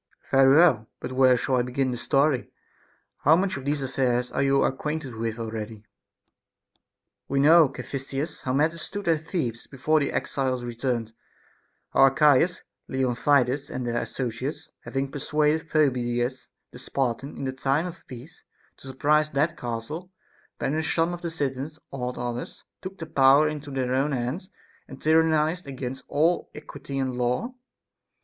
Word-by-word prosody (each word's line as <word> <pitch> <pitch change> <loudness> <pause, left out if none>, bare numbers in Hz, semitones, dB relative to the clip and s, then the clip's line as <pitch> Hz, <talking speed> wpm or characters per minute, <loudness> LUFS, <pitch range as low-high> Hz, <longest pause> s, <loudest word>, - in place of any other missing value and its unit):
Caph. - - -27
Very 135 0 +6
well; 140 -10 +5
but - - -6
where 130 -1 +5
shall 130 +2 0
I - - +3
begin 125 +1 -1
the - - -2
story? 140 +1 +1 0.7
How 155 +3 +5
much 190 +2 0
of 135 - -7
these 145 -1 -1
affairs 125 -2 0
are - - -1
you 135 0 +3
acquainted 150 0 -2
with 115 0 -3
already? 110 -1 -5
Arch. 105 0 -20 1.4
We 140 - 0
know, 155 +1 +7
Caphisias, 135 +3 -5
how 130 - -2
matters 160 +4 +1
stood 205 -2 -5
at 160 -1 +1
Thebes 125 - -3
before 155 +3 +1
the 140 - -1
exiles 130 -2 -1
returned, 120 -2 -3 0.4
— - - -41
how - - 0
Archias, 150 +5 +3 0.2
Leon 130 -2 0
tidas, 135 +1 +2
and 125 - -4
their 120 0 -1
associates, 130 +3 -4
having 135 0 -2
persuaded 150 +2 0
Phoebidas 125 -4 0 0.2
the - - -11
Spartan 135 +1 -2
in - - -5
the 130 - -1
time 135 +4 0
of 180 -1 -9
peace 130 +7 -11 0.3
to - - -13
surprise 150 +3 +2
that 155 +4 0
castle, 125 +8 -5 0.5
ban 135 - -1
ished 160 -1 -1
some 165 +1 +1
of 175 - -7
the 170 - -3
citizens, 145 -1 -3
awed 125 -2 -4
others, 120 0 -5 0.2
took 190 +1 -7
the 165 - -6
power 140 0 +5
into 150 -1 -5
their 130 -2 -1
own 140 +3 +1
hands, 135 +10 -3 0.4
and 135 - -11
tyrannized 160 +1 +2
against 130 -1 -5
all 160 +5 +1
equity 140 -2 -8
and 130 -2 -1
law. 125 - -1
135 Hz, 165 wpm, -26 LUFS, 125-155 Hz, 1.4 s, know